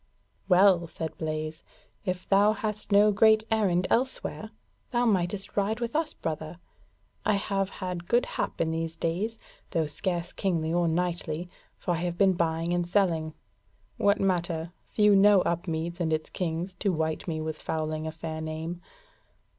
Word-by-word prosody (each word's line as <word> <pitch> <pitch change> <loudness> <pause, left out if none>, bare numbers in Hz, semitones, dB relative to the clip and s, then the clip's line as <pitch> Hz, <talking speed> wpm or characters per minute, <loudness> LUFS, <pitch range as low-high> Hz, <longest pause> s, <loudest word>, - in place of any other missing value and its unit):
"Well," 180 -2 +5
said 160 0 -5
Blaise, 155 0 -3 0.4
"if 185 -1 -3
thou 205 +2 +5
hast 215 -1 -4
no 205 +1 +6
great 220 +1 +5
errand 190 -5 +2
elsewhere, 260 +2 0 0.4
thou 245 -1 +1
mightest 195 -2 0
ride 210 +3 +1
with 235 +3 -3
us, 315 0 0
brother. 155 +1 -4 0.7
I 215 - +2
have 195 -1 -1
had 180 -3 -5
good 240 +1 +3
hap - - -3
in 160 -1 +1
these 165 0 -3
days, 190 +9 -2 0.3
though 165 -4 +1
scarce 175 +3 -2
kingly 165 -4 0
or 175 0 +2
knightly, 170 0 -2 0.3
for - - -2
I 170 - +1
have 175 +1 -2
been 195 -1 +5
buying 165 0 0
and 175 -1 0
selling: 170 -5 +1 0.6
what 200 0 +3
matter? 170 -3 0
few 210 -1 +4
know 200 0 +6
Upmeads 170 0 -2
and 165 -2 0
its 155 0 -1
kings 175 +1 -2
to 200 - +1
wite 160 0 -2
me 160 -2 -2
with 155 0 -4
fouling 155 0 -2
a - - -3
fair 160 0 -6
name. 160 +2 -5
175 Hz, 160 wpm, -28 LUFS, 160-200 Hz, 0.7 s, no